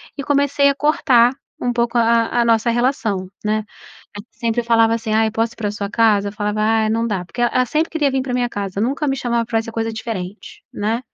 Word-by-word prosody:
e 280 - -5
comecei 280 0 +2
a 280 - 0
cortar 265 -5 +3 0.3
um 245 - -1
pouco 235 0 0
a 230 0 +3
a - - +2
nossa 230 0 +2
relação, 230 -6 0 0.2
né. 215 +1 0 0.7
Sempre 235 0 -2
falava 225 -1 +3
assim 225 -1 -3
"Ai 220 0 +3
posso 225 +1 -1
ir - - -35
pra 210 -2 -2
sua 205 -1 -4
casa?" 205 -2 +2
Eu - - -13
falava: 210 0 -2
"Ai 220 0 +2
não 230 +1 0
dá", 190 -5 -2
porque 240 - -8
e - - +5
ela 255 +1 +2
sempre 310 +6 -1
queria 300 -4 +1
vim 265 0 0
pra 255 -1 -4
minha 245 -1 0
casa 200 -3 -4
nunca 280 +6 -1
me 270 - 0
chamava 235 -2 -1
pra 225 -1 0
fazer 225 +1 -4
coisa 225 0 -3
diferente, 215 -3 -7
né? 220 +3 -1
230 Hz, 225 wpm, -19 LUFS, 215-245 Hz, 0.7 s, e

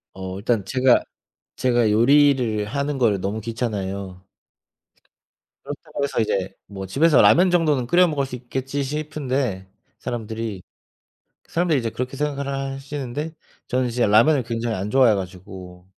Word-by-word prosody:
어 95 0 -6
일단 110 0 0
제가 130 +3 +3 0.5
제가 120 -3 +2
요리를 120 -2 +4
하는 140 +4 -2
거를 110 -5 +2
너무 100 +3 -3
귀찮아해요. 100 -5 -4 1.4
그렇다고 145 - -6
해서 140 - -1
이제 95 -4 -1
'뭐 95 -1 -7
집에서 145 - +4
라면 180 +2 +6
정도는 150 -8 +2
끓여 180 +4 +5
먹을 145 -4 -1
수 130 - -7
있겠지.' 130 +3 -4
싶은데 135 -8 -3 0.3
사람들이. 110 -3 -5 0.9
사람들이 165 -4 +1
이제 115 -2 -2
그렇게 125 +3 -5
생각을 140 -1 -2
하시는데 135 +1 -4 0.4
저는 130 0 +1
이제 120 0 0
라면을 120 +7 +4
굉장히 115 0 -3
안 100 +2 -3
좋아해 130 -4 +5
가지고. 90 -1 -8
120 Hz, 325 characters per minute, -22 LUFS, 105-140 Hz, 1.4 s, 라면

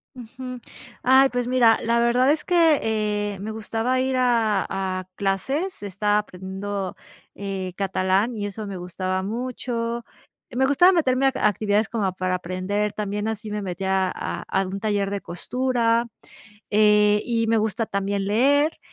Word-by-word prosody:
Ujú. 255 +1 -8 0.5
Ay, 265 +2 +6
pues 245 -2 -2
mira, 245 -3 +4
la 235 +1 +2
verdad 245 +3 +3
es 305 - -2
que, 335 -4 +4
eh, 210 -2 -1
me 215 +2 -4
gustaba 225 +3 -1
ir 260 0 0
a 230 -5 +2
a 185 -1 -3
clases. 265 - -2
Estaba 205 +1 +1
aprendiendo, 195 0 -5 0.4
eh, 195 -2 -4
catalán 195 +4 0
y 205 - -3
eso 205 +1 -6
me 200 -1 -5
gustaba 185 +1 -3
mucho. 235 +1 -3 0.5
Me 260 +2 +1
gustaba 285 +7 +6
meterme 270 -7 +2
a 270 - +5 0.2
actividades 210 +1 +1
como 205 -5 -1
para 185 0 -1
aprender, 185 +3 -2
también 210 0 -3
así 220 -1 -4
me 210 -1 -3
metía 190 +1 0
a - - -5
a 195 - 0
un 195 +1 -5
taller 205 -2 0
de 200 0 -3
costura, 235 +5 0 0.6
eh, 210 0 +4
y 230 -2 0
me 225 0 +2
gusta 220 +1 0
también 200 0 -2
leer, 285 +9 +3
210 Hz, 150 wpm, -23 LUFS, 195-245 Hz, 0.6 s, Ay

